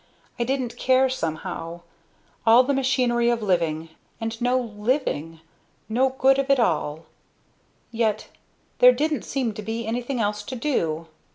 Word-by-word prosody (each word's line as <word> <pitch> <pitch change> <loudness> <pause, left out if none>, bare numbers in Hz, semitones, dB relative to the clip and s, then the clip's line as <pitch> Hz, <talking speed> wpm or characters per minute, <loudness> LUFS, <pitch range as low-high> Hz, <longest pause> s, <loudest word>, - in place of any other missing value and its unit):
I - - +2
didn't 255 -2 -2
care, 260 0 +3
somehow. 165 -4 -4 0.6
All 230 +3 +7
the 280 +2 0
machinery 250 -3 +2
of 235 -2 0
living, 165 -4 0 0.3
and 225 0 -4
no 245 +1 +2
living 210 - -2 0.5
no 250 +4 +2
good 270 +1 +4
of 275 0 -1
it 275 -1 +4
all! 155 -6 0 0.9
Yet 220 -2 0 0.5
there 250 0 +8
didn't 300 +4 -1
seem 255 -5 -2
to 215 - -7
be 225 +2 -4
anything 240 +3 -2
else 210 -1 -1
to 245 +5 -7
do. 170 - -1
235 Hz, 145 wpm, -24 LUFS, 205-260 Hz, 0.9 s, there